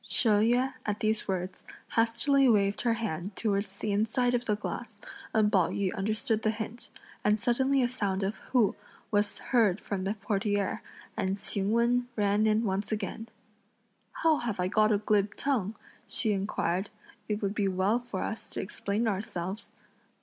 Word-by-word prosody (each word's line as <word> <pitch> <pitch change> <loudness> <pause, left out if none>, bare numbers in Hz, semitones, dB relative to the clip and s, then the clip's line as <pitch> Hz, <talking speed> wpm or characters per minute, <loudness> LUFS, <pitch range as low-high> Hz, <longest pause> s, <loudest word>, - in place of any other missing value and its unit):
She 245 - +1
Yüeh 240 +5 +3
at 210 -1 -1
these 220 -1 0
words 185 -1 -3 0.3
hastily 245 +4 +3
waved 200 -2 +3
her 235 -2 +2
hand 195 -3 -4
towards 200 -2 -1
the 210 - -2
inside 225 +4 +1
of 245 0 0
the 210 - +1
glass, 215 +1 -6 0.3
and 215 -1 +3
Pao 185 -6 +3
yü 200 -1 -1
understood 215 +2 0
the 220 - +1
hint; 220 +2 -5 0.3
and 210 +1 +3
suddenly 260 +3 +2
a - - +3
sound 200 -6 -1
of 200 +3 -2
"hu" 230 -6 +3 0.4
was 205 -1 +1 0.2
heard 215 -6 +4
from 195 -2 -3
the 200 +2 -1
portiere, 205 -1 -1 0.3
and 190 +1 -1
Ch'ing 195 0 -1
Wen 240 +2 +2
ran 205 +1 +2
in 215 +1 +3
once 200 0 -1
again. 215 +2 -3 0.9
"How 320 -2 +5
have 230 -7 -3
I 180 - +1
got 215 +2 +3
a 210 - +4
glib 210 -1 +1
tongue?" 225 -7 0 0.3
she 220 - +1
inquired; 195 -1 -1 0.4
"it 210 0 -1
would 200 0 0
be 205 -2 +1
well 190 +5 +2
for 240 -6 -4
us 220 - -4
to - - -4
explain 200 +3 -2
ourselves." 190 -1 -3
210 Hz, 170 wpm, -29 LUFS, 200-230 Hz, 0.9 s, How